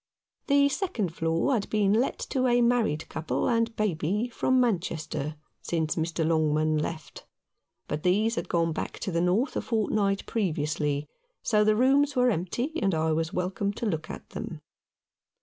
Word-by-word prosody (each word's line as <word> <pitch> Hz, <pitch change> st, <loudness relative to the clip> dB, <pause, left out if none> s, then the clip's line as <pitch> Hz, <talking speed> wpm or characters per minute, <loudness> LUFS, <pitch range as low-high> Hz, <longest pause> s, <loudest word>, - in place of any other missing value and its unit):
The 280 Hz, 0 st, +5 dB
second 245 Hz, -, -2 dB
floor 165 Hz, +10 st, +1 dB
had 220 Hz, -5 st, -1 dB
been 205 Hz, -2 st, +2 dB
let 235 Hz, +5 st, +1 dB
to 260 Hz, -1 st, +2 dB
a 245 Hz, 0 st, +4 dB
married 235 Hz, -10 st, +1 dB
couple 155 Hz, -, -2 dB
and 230 Hz, -1 st, +1 dB
baby 205 Hz, +3 st, 0 dB
from 255 Hz, +2 st, +1 dB
Manchester 165 Hz, -, -1 dB, 0.3 s
since 160 Hz, -2 st, -1 dB
Mr. 165 Hz, 0 st, -1 dB
Longman 155 Hz, -1 st, +2 dB
left; 155 Hz, +1 st, -6 dB, 0.6 s
but 150 Hz, +1 st, -3 dB
these 210 Hz, +6 st, +2 dB
had -, -, -3 dB
gone 165 Hz, -1 st, +1 dB
back -, -, -4 dB
to 190 Hz, -, -2 dB
the 170 Hz, 0 st, +1 dB
North 190 Hz, +10 st, +1 dB
a -, -, 0 dB
fortnight 205 Hz, -3 st, 0 dB
previously, 150 Hz, -7 st, -1 dB, 0.4 s
so 210 Hz, -2 st, +3 dB
the 215 Hz, 0 st, +3 dB
rooms 275 Hz, +4 st, +3 dB
were 250 Hz, -1 st, +4 dB
empty, 210 Hz, -, -2 dB
and 195 Hz, -4 st, +2 dB
I 160 Hz, 0 st, +1 dB
was 160 Hz, +1 st, 0 dB
welcome 190 Hz, +2 st, -1 dB
to 235 Hz, -, -4 dB
look 160 Hz, -7 st, -2 dB
at -, -, -8 dB
them. -, -, -6 dB
195 Hz, 165 wpm, -27 LUFS, 160-230 Hz, 0.6 s, The